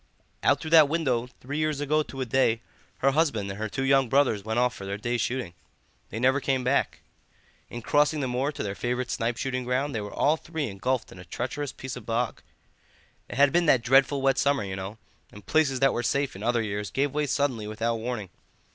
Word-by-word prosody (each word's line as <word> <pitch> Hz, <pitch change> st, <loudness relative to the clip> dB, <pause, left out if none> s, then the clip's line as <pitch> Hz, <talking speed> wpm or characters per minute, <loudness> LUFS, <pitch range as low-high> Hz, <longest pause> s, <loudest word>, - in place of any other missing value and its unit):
"Out -, -, +3 dB
through 160 Hz, -, -6 dB
that 155 Hz, -3 st, +7 dB
window, 130 Hz, -7 st, 0 dB
three 135 Hz, +3 st, -6 dB
years 155 Hz, -2 st, 0 dB
ago 150 Hz, +1 st, +2 dB
to 135 Hz, -3 st, -6 dB
a -, -, 0 dB
day, 115 Hz, -2 st, +2 dB, 0.4 s
her 135 Hz, -, +6 dB
husband 135 Hz, -10 st, +1 dB
and 95 Hz, -, -8 dB
her 110 Hz, 0 st, -2 dB
two 135 Hz, +5 st, -3 dB
young 135 Hz, -2 st, +3 dB
brothers 130 Hz, -7 st, +2 dB
went 110 Hz, +2 st, -2 dB
off 125 Hz, 0 st, +2 dB
for -, -, -9 dB
their 100 Hz, +1 st, -4 dB
day's 120 Hz, +2 st, -1 dB
shooting. 125 Hz, -8 st, -2 dB, 0.6 s
They 110 Hz, -, -6 dB
never 130 Hz, +3 st, +3 dB
came 135 Hz, -2 st, 0 dB
back. 130 Hz, +3 st, 0 dB, 0.7 s
In 120 Hz, -1 st, -7 dB
crossing 150 Hz, +3 st, +2 dB
the 135 Hz, -, -1 dB
moor 130 Hz, +4 st, -1 dB
to -, -, -4 dB
their 100 Hz, -, -3 dB
favourite 125 Hz, +3 st, -2 dB
snipe 115 Hz, +1 st, -1 dB
shooting 130 Hz, -1 st, -2 dB
ground 130 Hz, +3 st, -1 dB
they 110 Hz, -, -2 dB
were 105 Hz, -, -6 dB
all 150 Hz, +3 st, +2 dB
three 160 Hz, -2 st, -4 dB
engulfed 120 Hz, +5 st, -2 dB
in 90 Hz, -, -12 dB
a -, -, -9 dB
treacherous 130 Hz, -, -4 dB
piece 130 Hz, -1 st, -7 dB
of 125 Hz, -4 st, -10 dB
bog. 115 Hz, +1 st, -1 dB, 0.9 s
It -, -, -6 dB
had 140 Hz, +1 st, +5 dB
been 175 Hz, -1 st, +3 dB
that 130 Hz, -5 st, +4 dB
dreadful 135 Hz, +3 st, +4 dB
wet 135 Hz, -1 st, +3 dB
summer, 140 Hz, -4 st, +2 dB
you 95 Hz, -1 st, -4 dB
know, 95 Hz, +3 st, -6 dB, 0.3 s
and 105 Hz, -1 st, -13 dB
places 150 Hz, -4 st, +2 dB
that 135 Hz, -1 st, +4 dB
were 120 Hz, -, -1 dB
safe 140 Hz, +2 st, 0 dB
in 95 Hz, -, -9 dB
other 120 Hz, +1 st, +1 dB
years 105 Hz, -1 st, -3 dB
gave 140 Hz, 0 st, 0 dB
way 150 Hz, 0 st, 0 dB
suddenly 130 Hz, -7 st, 0 dB
without 115 Hz, +2 st, -1 dB
warning. 110 Hz, -4 st, -4 dB
125 Hz, 225 wpm, -27 LUFS, 115-140 Hz, 0.9 s, that